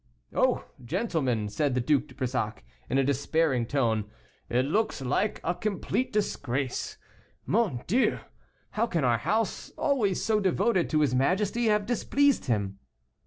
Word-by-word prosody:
"Oh! - - +2 0.2
gentlemen," 125 - -1
said 140 +4 0
the - - +2
Duc 140 +3 +2
de - - -16
Brissac, 120 - -2 0.3
in 135 - +1
a 135 - +4
despairing 140 -2 +1
tone, 115 -6 0 0.4
"it 125 +2 +2
looks 215 +7 0
like 145 +11 0
a 175 - +1
complete 215 +6 -2
disgrace. 135 - -2 0.5
Mon 200 - +1
Dieu! 245 +9 +2 0.5
how 230 +2 0
can 170 -9 -1
our 120 -2 +3
house, 220 - -1
always 225 - +1
so 220 -1 +1
devoted 195 0 +1
to 155 -1 +2
his 145 -4 +2
majesty, 190 - +1
have 210 -2 +2
displeased 280 +4 +2
him?" 100 -4 -1
150 Hz, 145 wpm, -28 LUFS, 125-210 Hz, 0.5 s, a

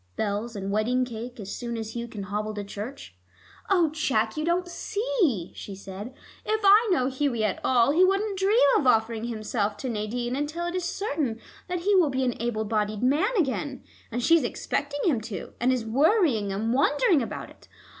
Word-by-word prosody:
Bells 215 +2 -2
and 195 -1 -4
wedding 240 +5 +1
cake 240 0 -7
as 200 -1 -6
soon 235 -1 -4
as 220 -1 -5
Hugh 235 0 -3
can 210 -3 -7
hobble 210 +2 -3
to 205 - -4
church." 205 - -8 0.5
"Oh, 350 -6 +3
Jack, 245 -8 0
you 305 - -2
don't 345 +2 +1
see," 360 - -1
she 200 - -8
said. 195 +6 -8 0.3
"If 435 0 0
I 415 +3 +6
know 260 -8 +3
Hughie 260 -4 0
at 200 - -1
all, 250 0 +4
he 340 +5 +4
wouldn't 390 +1 +1
dream 400 +4 +3 0.2
of 270 - 0
offering 225 -1 +2
himself 215 -2 -2
to 255 - -4
Nadine 240 +3 -2
until 300 +5 -2
it 345 - -3
is 365 -1 -2
certain 300 - -2 0.3
that 360 -1 -2
he 405 +4 +2
will 360 -6 +5
be 265 -1 -1
an 245 - +1
able 225 -2 -1
bodied 215 0 -1
man 295 - +3
again. 275 -4 -1 0.3
And 240 +2 -3
she 335 - +6
is 315 - 0
expecting 285 +3 -2
him 260 -10 +2
to, 215 -2 -7
and 250 +2 +3
is 250 -3 -1
worrying 270 - +2
and 220 +4 -1
wondering 285 +3 +3
about 230 - -5
it. - - -19
250 Hz, 195 wpm, -26 LUFS, 220-320 Hz, 0.5 s, I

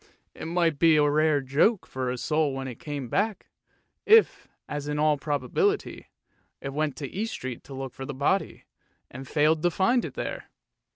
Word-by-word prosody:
It - - -8
might 165 -3 +1
be 165 -2 +6
a 150 -1 +4
rare 150 0 +3
joke 145 - +2
for 130 -1 -3
the 125 - -2
soul 150 +1 0
when 135 0 -4
it 125 -3 -8
came 145 -4 -5
back, 205 - -1 0.5
if, 445 0 +5 0.2
as 145 -1 -5
in 150 0 -2
all 150 0 +3
probability, 145 - -1 0.5
it 135 0 -6
went 150 -2 -1
to 140 - -5
East 220 - -4
Street 125 -2 -6
to 135 - -9
look 135 -1 -6
for 135 - -7
the - - -5
body, 145 +9 0 0.5
and 130 +1 -9
failed 155 +2 +2
to 175 - +3
find 235 +8 +2
it - - -6
there. - - -5
150 Hz, 185 wpm, -26 LUFS, 135-165 Hz, 0.5 s, be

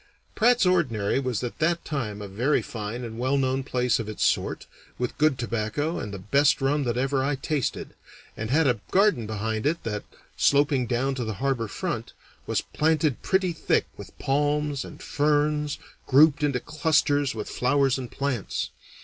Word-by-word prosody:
Pratt's 240 -1 +4
Ordinary 130 - +2
was 125 -3 -2
at 120 - -5
that 170 +1 +1
time 105 -9 -3
a - - -6
very 120 +10 +1
fine 115 +2 -5
and 115 -1 -7
well 130 +3 +1
known 130 0 +1
place 125 -2 +1
of 110 -2 -4
its 110 - -1
sort, - - 0 0.3
with 125 -1 -3
good 150 -3 +3
tobacco 120 +8 -2
and 105 - -5
the 100 - -5
best 140 +10 +3
rum 140 +1 +1
that 120 0 -1
ever 135 +1 +1
I 140 +1 0
tasted, 140 0 -2 0.4
and 110 0 -4
had 155 +4 +3
a 125 -4 +2
garden 190 - +3
behind 110 +2 -2
it 165 +2 -1
that, 105 -2 -3 0.3
sloping 140 -3 +3
down 130 +4 0
to 130 -2 -3
the 110 -2 -3
harbor 130 -2 -1
front, 95 - -4 0.3
was - - +1
planted 155 -3 0
pretty 190 -2 +1
thick 160 - +1
with - - -12
palms 145 0 0
and - - -11
ferns 150 0 +1 0.3
grouped 150 +2 +5
into 140 -4 +1
clusters 145 -2 +1
with 105 - -4
flowers 135 +1 +1
and 125 -2 -6
plants. 135 -7 -3
135 Hz, 175 wpm, -26 LUFS, 120-150 Hz, 0.4 s, grouped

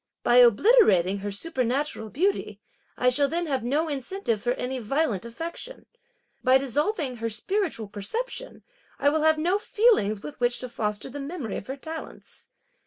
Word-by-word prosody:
By 240 - +4
obliterating 235 - +5
her 205 +1 -4
supernatural 255 +1 -2
beauty, 380 - -1 0.4
I 250 - +3
shall 280 +3 +2
then 340 +4 -2
have 270 -6 -1
no 290 +7 0
incentive 275 - -2
for 245 +2 +1
any 255 +1 -3
violent 240 - -1
affection; 335 - -7 0.6
by 255 0 +6
dissolving 275 - -1
her 230 0 -2
spiritual 330 - -2
perception, 465 - -5 0.3
I 285 - +3
will 310 +1 +1
have 315 0 +4
no 355 +6 +1
feelings 410 - +2
with 295 - -8
which 245 0 +2
to 255 - -5
foster 210 -3 -3
the 285 +2 -7
memory 280 - -5
of - - -8
her 265 +2 -5
talents. 320 +3 -9
270 Hz, 160 wpm, -26 LUFS, 230-325 Hz, 0.6 s, by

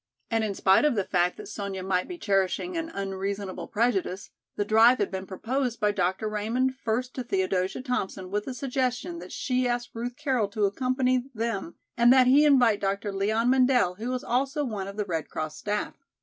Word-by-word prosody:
And 225 -1 +1
in 205 -2 -2
spite 190 +5 +4
of 300 -4 +3
the 200 - +1
fact 180 -1 +1
that - - -9
Sonya 200 -2 -5
might 185 -1 0
be 360 - -7
cherishing 200 - 0
an 330 -1 -3
unreasonable 195 - -4
prejudice, 205 -4 -1 0.2
the 205 - -1
drive 225 +4 +6
had 205 - -1
been 190 0 -5
proposed 240 +5 -2
by 210 -2 +2
Dr. 190 +2 -1
Raymond 225 +5 0
first 250 0 -2
to 255 - -4
Theodosia 190 0 -1
Thompson 190 -7 -3
with 205 +1 -1
the 260 - -5
suggestion 260 +5 -2
that - - -10
she 255 -1 0
ask 240 0 -2
Ruth 240 +2 -4
Carroll 250 -7 0
to 210 0 0
accompany 255 +3 0
them 220 -6 -3 0.2
and 240 0 +5
that 260 -1 +6
he 280 +4 +6
invite 245 -8 +4
Dr. 200 +1 -1
Leon 220 +5 +1
Mendel 255 -7 +3
who 235 +3 -3
was 255 0 -2
also 275 +4 0
one 205 -6 -4
of 200 +1 -8
the 210 - -1
Red 165 -5 -3
Cross 155 0 -4
staff. 210 0 -2
220 Hz, 195 wpm, -27 LUFS, 195-255 Hz, 0.2 s, drive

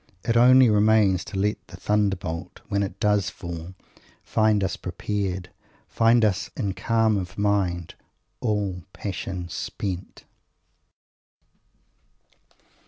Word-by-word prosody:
It 115 - 0
only 125 +2 +7
remains 105 -3 +4
to 100 - -6
let 105 +2 +1
the - - -11
thunderbolt, 95 -5 -1
when 100 -1 +1
it 100 - -4
does 105 -3 +2
fall, 85 +1 -8 0.5
find 110 -2 +2
us 95 - -1
prepared; 95 -3 -3 0.4
find 115 0 +4
us 100 -3 0
in 100 -6 -1
calm 115 0 +2
of 90 -2 -5
mind, 95 -5 0 0.5
"all 105 -5 -1
passion 95 -2 -5
spent." 90 +2 -5
100 Hz, 105 wpm, -25 LUFS, 90-110 Hz, 0.5 s, only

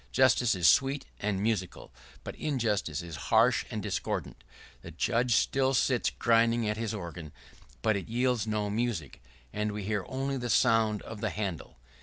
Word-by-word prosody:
Justice 125 -4 +3
is 90 -2 +3
sweet 135 0 +3
and 100 -2 -1
musical; 105 -5 -2 0.3
but - - -6
injustice 105 - -1
is 85 -2 -7
harsh - - +4
and - - -4
discordant. - - -3 0.4
The - - -10
judge 115 +8 +1
still 135 0 +2
sits 125 -1 +2
grinding 115 0 +2
at 105 - 0
his 110 0 -3
organ, 85 -5 -7 0.5
but 110 -1 +3
it 100 0 -5
yields 120 -2 0
no 105 -1 -1
music, 105 - -3 0.3
and 105 0 -1
we 105 0 -5
hear 105 -1 -1
only 135 +1 -2
the 120 -1 -4
sound 110 -1 +3
of 110 -2 -9
the 110 - 0
handle. 95 - -5
110 Hz, 165 wpm, -29 LUFS, 100-120 Hz, 0.5 s, harsh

